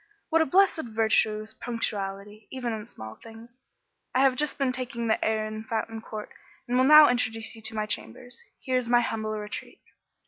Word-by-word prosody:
"What 325 -1 +4
a 320 - +2
blessed 370 -1 +3
virtue 220 -1 +1
is 215 0 -8
punctuality, 205 -3 -4
even 245 -3 -3
in 220 0 -6
small 110 - -10
things. 230 +2 -13 0.6
I 260 - +4
have 270 -2 +4
just 300 +1 -1
been 275 -2 +1
taking 250 -2 -4
the 220 - +1
air 220 -1 +1
in 215 0 -6
Fountain 225 0 -3
Court, 215 -1 -7 0.4
and 245 - -1
will 255 +1 +4
now 305 +1 +9
introduce 225 -3 -1
you 225 - -12
to 220 +1 -4
my 215 -1 -1
chambers. 215 - -6 0.2
Here 255 -1 0
is 245 -2 -1
my 240 0 +5
humble 220 -2 -2
retreat." 210 0 -7
225 Hz, 195 wpm, -27 LUFS, 215-255 Hz, 0.6 s, now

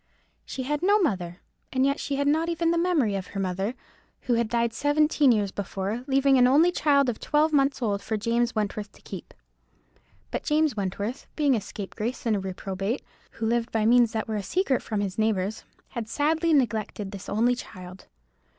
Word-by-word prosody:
She 260 - -5
had 295 +3 -2
no 405 +3 +4
mother, 185 - -1 0.3
and 270 +2 +1
she 280 - -2
had 285 +1 0
not 320 +3 +2
even 335 0 +1
the 340 - +1
memory 330 - +2
of 195 -2 -3
her 195 - -6
mother, 195 +5 -2 0.5
who 245 - 0
had 230 -1 +1
died 235 0 +1
seventeen 290 +1 +3
years 205 -4 +1
before, 200 +4 -4
leaving 270 -1 +4
an 250 - +6
only 310 +7 +5
child 280 -5 +3
of 240 -3 -2
twelve 305 +1 +2
months 275 -2 +2
old 200 -3 0
for 220 +2 -2
James 235 +2 0
Wentworth 210 -1 -2
to - - -19
keep. - - -8 1.0
But - - -2
James 305 -4 +1
Wentworth, 205 +4 -3
being 290 -4 +3
a 220 - -1
scapegrace 215 +6 -5
and 225 -2 +2
a - - 0
reprobate, 195 +4 -3 0.3
who 230 - -4
lived 235 +1 0
by 220 -1 +1
means 240 0 +5
that 220 -1 -2
were 220 -1 -2
a - - -2
secret 270 - 0
from 215 -2 -2
his 195 0 -3
neighbours, 215 -1 0 0.2
had 225 -2 -5
sadly 315 +6 +1
neglected 220 -7 0
this 200 -1 -8
only 235 +4 +2
child. 185 -6 -9
235 Hz, 190 wpm, -26 LUFS, 205-285 Hz, 1.0 s, an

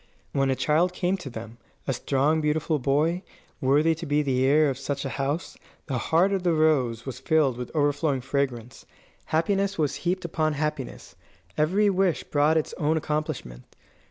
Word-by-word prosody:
When 135 -1 +1
a 130 - +2
child 165 +7 +2
came 180 +1 0
to 165 -7 -8
them, 115 0 -9 0.3
a 135 - 0
strong, 140 +5 +1
beautiful 155 +1 0
boy, 150 +7 +1 0.4
worthy 145 +5 +3
to 165 +1 -7
be 145 +1 +2
the 130 -2 +1
heir 150 +3 +4
of 135 -3 -2
such 140 0 -3
a - - -2
house, 145 +6 -3 0.3
the 130 -4 -2
heart 170 - +2
of 195 - 0
the 175 -2 +2
rose 135 -8 +2
was 130 -2 -6
filled 145 -2 +2
with 125 0 -6
overflowing 145 -2 +1
fragrance. 130 -3 -3 0.4
Happiness 195 +5 0
was 150 -3 0
heaped 180 +1 -2
upon 155 -2 0
happiness. 150 -3 -4 0.4
Every 185 +8 +2
wish 190 -2 +1
brought 150 +2 +2
its 155 - -1
own 155 +1 +2
accomplishment. 150 - -3
150 Hz, 170 wpm, -26 LUFS, 135-160 Hz, 0.4 s, heir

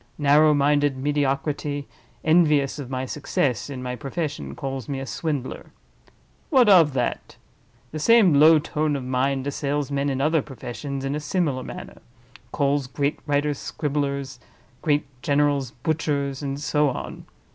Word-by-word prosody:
Narrow 150 +1 +5
minded 145 -1 +2
mediocrity, 145 +1 -1 0.4
envious 155 -4 +3
of 135 -3 -6
my 130 0 -3
success 135 -2 -1
in 130 -2 -6
my 125 0 -3
profession, 145 +2 -4
calls 135 -4 -5
me 135 -1 -2
a 135 - -5
Swindler. 145 -2 -4 0.8
What 260 -6 +5
of 170 -8 +6
that? 125 -2 -2 0.6
The 155 - -5
same 220 -1 +5
low 155 +3 +7
tone 150 -1 -1
of 135 - -4
mind 130 +1 0
assails 145 0 -2
men 140 0 0
in 135 -1 -2
other 155 +2 +2
professions 135 +1 -6
in 135 - -1
a 150 - -2
similar 150 -4 -1
manner—calls 140 - -5
great 140 +2 -1
writers 145 0 0
scribblers—great 140 0 -3 0.2
generals, 140 -1 +1
butchers—and 140 0 -2
so 150 0 +1
on. 125 - -7
145 Hz, 135 wpm, -24 LUFS, 135-150 Hz, 0.8 s, low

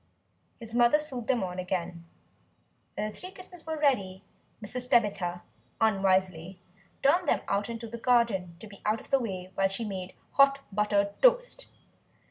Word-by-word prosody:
His 230 -2 -10
mother 240 +4 +5
sewed 265 -6 -6
them 250 -6 +1
on 180 0 -4
again. 180 -2 -3 0.9
When 210 - -1
the 215 - -8
three 365 - -6
kittens 365 -3 -14
were 320 0 -2
ready, 200 -11 +1 0.4
Mrs. 250 +4 -1
Tabitha 200 -7 +1 0.4
unwisely 190 -4 +1 0.4
turned 335 +5 +3
them - - +2
out 200 +2 0
into 230 0 -5
the 235 +1 -7
garden, 225 -8 +2
to - - -8
be 200 -2 -13
out 215 +1 +1
of - - -15
the 275 - +4
way 185 -6 -5
while 195 0 +2
she 195 +4 -2
made 190 -3 -6 0.2
hot 275 0 +5 0.2
buttered 200 -1 0
toast. - - +3
215 Hz, 160 wpm, -29 LUFS, 190-255 Hz, 0.9 s, mother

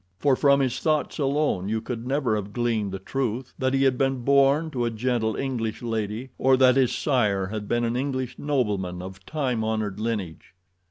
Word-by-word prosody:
For, 140 +2 +3
from 140 0 +4
his 130 -1 0
thoughts 155 -1 0
alone, 140 -9 0
you 110 +1 0
could 115 +1 -6
never 135 -4 +1
have 105 -1 -4
gleaned 115 -4 0
the 95 - -4
truth 120 +4 -3
that 130 0 +1
he 135 - +2
had 130 -2 +2
been 135 -2 0
born 140 +4 +3
to 125 -4 -1
a - - +1
gentle 115 -1 -1
English 120 -5 -3
lady 115 +2 -3
or 130 0 +4
that 130 -1 +5
his 130 -2 +3
sire 105 -9 +1
had 105 -1 -5
been 120 +2 +1
an 115 0 0
English 130 -1 -3
nobleman 100 -11 -1
of 95 +1 -9
time 130 -7 -1
honored 110 -2 -2
lineage. 105 -6 -4
120 Hz, 195 wpm, -25 LUFS, 110-135 Hz, -, that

